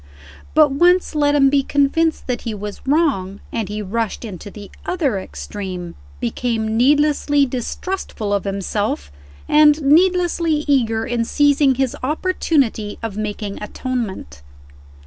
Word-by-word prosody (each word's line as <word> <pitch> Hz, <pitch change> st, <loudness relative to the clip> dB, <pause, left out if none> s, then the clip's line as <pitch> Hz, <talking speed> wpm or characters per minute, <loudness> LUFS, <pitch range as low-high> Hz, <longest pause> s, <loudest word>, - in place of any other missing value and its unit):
But 305 Hz, -2 st, +6 dB
once 355 Hz, +6 st, +3 dB
let 290 Hz, -1 st, +2 dB
him 275 Hz, -2 st, +4 dB
be 280 Hz, -1 st, +4 dB
convinced 285 Hz, +4 st, +1 dB
that 250 Hz, -1 st, -2 dB
he 225 Hz, -3 st, -4 dB
was 205 Hz, 0 st, -7 dB
wrong, 265 Hz, -, +1 dB
and 220 Hz, -4 st, -3 dB
he 210 Hz, 0 st, -4 dB
rushed 225 Hz, +3 st, -3 dB
into 205 Hz, -2 st, -8 dB
the 205 Hz, 0 st, -11 dB
other 285 Hz, -, -1 dB
extreme 185 Hz, -3 st, -7 dB, 0.3 s
became 220 Hz, -, -2 dB
needlessly 290 Hz, +2 st, +3 dB
distrustful 250 Hz, -, -4 dB
of 200 Hz, -, 0 dB
himself, 195 Hz, -, -2 dB, 0.4 s
and 300 Hz, 0 st, +5 dB
needlessly 335 Hz, 0 st, +3 dB
eager 225 Hz, -5 st, +1 dB
in 235 Hz, -1 st, -1 dB
seizing 285 Hz, +1 st, +3 dB
his 265 Hz, -1 st, 0 dB
opportunity 280 Hz, -, 0 dB
of 225 Hz, -3 st, -4 dB
making 210 Hz, -1 st, -4 dB
atonement. 210 Hz, -, -5 dB
250 Hz, 125 wpm, -20 LUFS, 210-295 Hz, 0.4 s, But